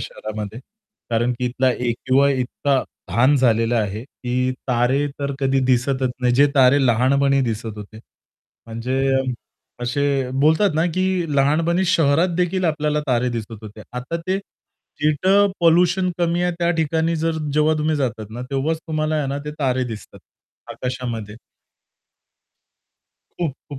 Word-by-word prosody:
शहरामध्ये. 110 Hz, +1 st, -6 dB, 0.5 s
कारण 120 Hz, +2 st, +1 dB
की 125 Hz, -, -2 dB
इथला 130 Hz, +1 st, +1 dB
ए-क्यू-आय 130 Hz, +3 st, +1 dB
इतका 135 Hz, +2 st, 0 dB, 0.3 s
धान 120 Hz, +10 st, +3 dB
झालेला 115 Hz, -2 st, +2 dB
आहे, 105 Hz, 0 st, -2 dB
की 125 Hz, -1 st, -2 dB, 0.2 s
तारे 125 Hz, +4 st, +2 dB
तर 140 Hz, -1 st, -2 dB
कधी 135 Hz, 0 st, +2 dB
दिसतच 130 Hz, +1 st, +1 dB
नाहीत, 125 Hz, -1 st, +2 dB
जे 140 Hz, +3 st, +6 dB
तारे 135 Hz, 0 st, +5 dB
लहानपणी 135 Hz, +4 st, +3 dB
दिसत 115 Hz, -3 st, -3 dB
होते. 105 Hz, +1 st, -10 dB, 0.7 s
म्हणजे 120 Hz, +4 st, -2 dB, 0.8 s
असे 135 Hz, +1 st, 0 dB
बोलतात 160 Hz, +5 st, +3 dB
ना, 160 Hz, +2 st, +2 dB
की 185 Hz, -4 st, 0 dB
लहानपणी 165 Hz, +6 st, +2 dB
शहरात 165 Hz, -1 st, +3 dB
देखील 180 Hz, +1 st, 0 dB
आपल्याला 150 Hz, -2 st, 0 dB
तारे 125 Hz, -1 st, +1 dB
दिसत 115 Hz, -1 st, -5 dB
होते. 110 Hz, 0 st, -10 dB
आता 125 Hz, +6 st, -4 dB
ते, 190 Hz, +1 st, 0 dB, 0.6 s
जिथं 190 Hz, +7 st, +3 dB
पोल्युशन 180 Hz, +2 st, +3 dB
कमी 175 Hz, 0 st, +1 dB
आहे, 180 Hz, 0 st, +1 dB
त्या 170 Hz, 0 st, +1 dB
ठिकाणी 160 Hz, +1 st, 0 dB
जर 160 Hz, 0 st, -1 dB
जेव्हा 155 Hz, +1 st, +3 dB
तुम्ही 155 Hz, 0 st, 0 dB
जातात 115 Hz, -6 st, -3 dB
ना, 120 Hz, +3 st, -6 dB
तेव्हाच 145 Hz, +4 st, -1 dB
तुम्हाला 155 Hz, 0 st, -1 dB
आहे 150 Hz, -2 st, -1 dB
ना 140 Hz, +1 st, -2 dB
ते 150 Hz, -, -4 dB
तारे 130 Hz, -2 st, +1 dB
दिसतात, 110 Hz, -3 st, -8 dB, 0.5 s
आकाशामध्ये. 120 Hz, -5 st, -5 dB, 2.0 s
खूप, 165 Hz, -6 st, -2 dB, 0.2 s
खूप. 145 Hz, -, -7 dB
135 Hz, 140 wpm, -21 LUFS, 120-160 Hz, 2.0 s, जे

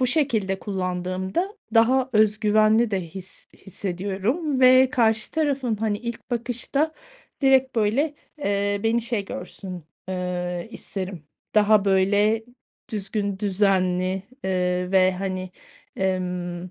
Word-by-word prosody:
bu 255 Hz, -, +3 dB
şekilde 225 Hz, -9 st, +1 dB
kullandığımda 190 Hz, -, -3 dB, 0.2 s
daha 255 Hz, +3 st, +4 dB
öz 215 Hz, 0 st, +3 dB
güvenli 215 Hz, +1 st, +4 dB
de 195 Hz, -, 0 dB
his 180 Hz, +2 st, -11 dB
hissediyorum 200 Hz, -, -2 dB
ve 255 Hz, +1 st, +7 dB
karşı 220 Hz, -5 st, +1 dB
tarafın, 275 Hz, -7 st, 0 dB
hani, 210 Hz, -1 st, -1 dB
ilk 235 Hz, +2 st, -7 dB
bakışta 245 Hz, +6 st, -1 dB, 0.5 s
direkt, 265 Hz, -2 st, +4 dB
böyle, 255 Hz, +8 st, +1 dB, 0.2 s
eee, 200 Hz, -4 st, 0 dB
beni 225 Hz, +1 st, +2 dB
şey 230 Hz, -4 st, -1 dB
görsün, 180 Hz, -2 st, -8 dB, 0.2 s
eee, 180 Hz, 0 st, -3 dB
isterim. 190 Hz, -7 st, -6 dB, 0.3 s
Daha, 210 Hz, -1 st, +5 dB
böyle, 205 Hz, +3 st, +3 dB, 0.5 s
düzgün, 200 Hz, -2 st, -3 dB
düzenli, 185 Hz, -2 st, +1 dB, 0.2 s
eee, 180 Hz, -1 st, 0 dB
ve, 185 Hz, 0 st, +5 dB
hani, 185 Hz, -1 st, -4 dB, 0.5 s
emm 180 Hz, -1 st, -2 dB
205 Hz, 110 wpm, -24 LUFS, 185-235 Hz, 0.5 s, ve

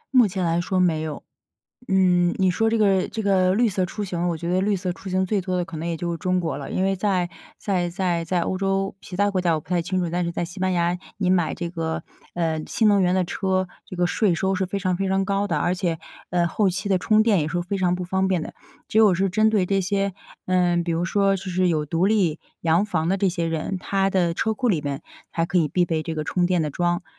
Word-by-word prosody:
目 245 Hz, -4 st, +7 dB
前 185 Hz, -1 st, -2 dB
来 170 Hz, +1 st, +1 dB
说 185 Hz, +2 st, -1 dB
没 170 Hz, -4 st, +2 dB
有。 155 Hz, -2 st, -5 dB, 0.6 s
嗯， 180 Hz, -2 st, +3 dB
你 190 Hz, -1 st, +4 dB
说 225 Hz, +5 st, +1 dB
这 230 Hz, -, +1 dB
个 195 Hz, -3 st, +3 dB
这 225 Hz, -, -4 dB
个 185 Hz, -2 st, +3 dB
绿 235 Hz, +1 st, +3 dB
色 185 Hz, -2 st, 0 dB
出 210 Hz, +4 st, -5 dB
行， 175 Hz, -3 st, -2 dB
我 170 Hz, -, 0 dB
觉 170 Hz, +2 st, -4 dB
得 180 Hz, -, +2 dB
绿 200 Hz, +2 st, +1 dB
色 185 Hz, -1 st, -2 dB
出 190 Hz, +2 st, -10 dB
行 185 Hz, +1 st, +1 dB
最 205 Hz, +2 st, 0 dB
多 185 Hz, 0 st, -2 dB
的 180 Hz, -, 0 dB
可 165 Hz, -1 st, -8 dB
能 165 Hz, +2 st, -4 dB
也 170 Hz, -, -1 dB
就 170 Hz, +2 st, -3 dB
是 170 Hz, -, -3 dB
中 185 Hz, +3 st, 0 dB
国 160 Hz, -5 st, -2 dB
了。 140 Hz, -, -7 dB
因 185 Hz, -, 0 dB
为 195 Hz, 0 st, +2 dB
在 185 Hz, -2 st, 0 dB, 0.3 s
在 180 Hz, -4 st, -1 dB
在 175 Hz, -2 st, -1 dB
在 175 Hz, +1 st, 0 dB
欧 185 Hz, -, -1 dB
洲， 195 Hz, 0 st, 0 dB
其 180 Hz, -, -9 dB
他 205 Hz, +2 st, +2 dB
国 190 Hz, -, 0 dB
家 175 Hz, -2 st, +2 dB
我 155 Hz, -, -1 dB
不 -, -, -26 dB
太 180 Hz, -1 st, +1 dB
清 180 Hz, +3 st, -2 dB
楚， 170 Hz, -, -2 dB
但 175 Hz, 0 st, 0 dB
是 170 Hz, -, -2 dB
在 -, -, -2 dB
西 175 Hz, +3 st, -8 dB
班 185 Hz, 0 st, +1 dB
牙 175 Hz, 0 st, +1 dB, 0.2 s
你 190 Hz, -3 st, 0 dB
买 180 Hz, -3 st, +2 dB
这 175 Hz, -2 st, -4 dB
个， 165 Hz, -1 st, -3 dB, 0.3 s
呃， 165 Hz, -2 st, -1 dB
新 220 Hz, -, +1 dB
能 200 Hz, -1 st, +4 dB
源 180 Hz, -1 st, +2 dB
的 185 Hz, -, +2 dB
车， 185 Hz, +1 st, -1 dB, 0.2 s
这 190 Hz, -, -8 dB
个 175 Hz, 0 st, +1 dB
税 195 Hz, 0 st, +2 dB
收 190 Hz, +2 st, 0 dB
是 190 Hz, 0 st, 0 dB
非 195 Hz, +2 st, -3 dB
常 185 Hz, -2 st, 0 dB
非 195 Hz, +1 st, -1 dB
常 190 Hz, 0 st, +1 dB
高 200 Hz, +1 st, 0 dB
的， 165 Hz, -6 st, 0 dB
而 175 Hz, +4 st, +1 dB
且， 170 Hz, -3 st, -2 dB, 0.3 s
呃， 175 Hz, -1 st, +2 dB
后 195 Hz, +3 st, +1 dB
期 190 Hz, +2 st, -3 dB
的 190 Hz, -, +4 dB
充 215 Hz, +4 st, +3 dB
电 215 Hz, -5 st, +3 dB
也 150 Hz, -, -1 dB
是 175 Hz, +3 st, -1 dB
非 190 Hz, +3 st, -3 dB
常 180 Hz, -2 st, +1 dB
不 180 Hz, -, -4 dB
方 190 Hz, +2 st, 0 dB
便 185 Hz, -3 st, +1 dB
的。 -, -, -7 dB, 0.4 s
只 -, -, 0 dB
有 215 Hz, -3 st, +6 dB
是 190 Hz, +2 st, +1 dB
针 215 Hz, +4 st, +3 dB
对 205 Hz, -4 st, +2 dB
这 195 Hz, +1 st, +1 dB
些 195 Hz, +1 st, 0 dB, 0.3 s
嗯， 175 Hz, -2 st, +2 dB
比 170 Hz, -, -2 dB
如 165 Hz, +2 st, 0 dB
说 195 Hz, +2 st, +2 dB
就 190 Hz, -, -9 dB
是 185 Hz, -1 st, 0 dB
有 155 Hz, -3 st, 0 dB
独 165 Hz, +5 st, +1 dB
立 190 Hz, -7 st, +2 dB, 0.2 s
洋 165 Hz, +3 st, +3 dB
房 170 Hz, -6 st, -1 dB
的 190 Hz, -, +2 dB
这 195 Hz, 0 st, +1 dB
些 170 Hz, -1 st, -2 dB
人， 165 Hz, +4 st, -2 dB
他 195 Hz, +1 st, 0 dB
的 180 Hz, -3 st, +1 dB
车 220 Hz, +6 st, 0 dB
库 250 Hz, +3 st, -1 dB
里 175 Hz, -9 st, +1 dB
边 140 Hz, -1 st, -4 dB, 0.3 s
还 165 Hz, -, 0 dB
可 180 Hz, -, 0 dB
以 165 Hz, -3 st, +3 dB
必 180 Hz, +3 st, +2 dB
备 160 Hz, -2 st, -1 dB
这 165 Hz, -, -4 dB
个 155 Hz, -, -2 dB
充 180 Hz, +3 st, +1 dB
电 180 Hz, -2 st, +1 dB
的 150 Hz, -, -1 dB
桩， 175 Hz, +2 st, 0 dB
180 Hz, 295 characters per minute, -23 LUFS, 170-195 Hz, 0.6 s, 目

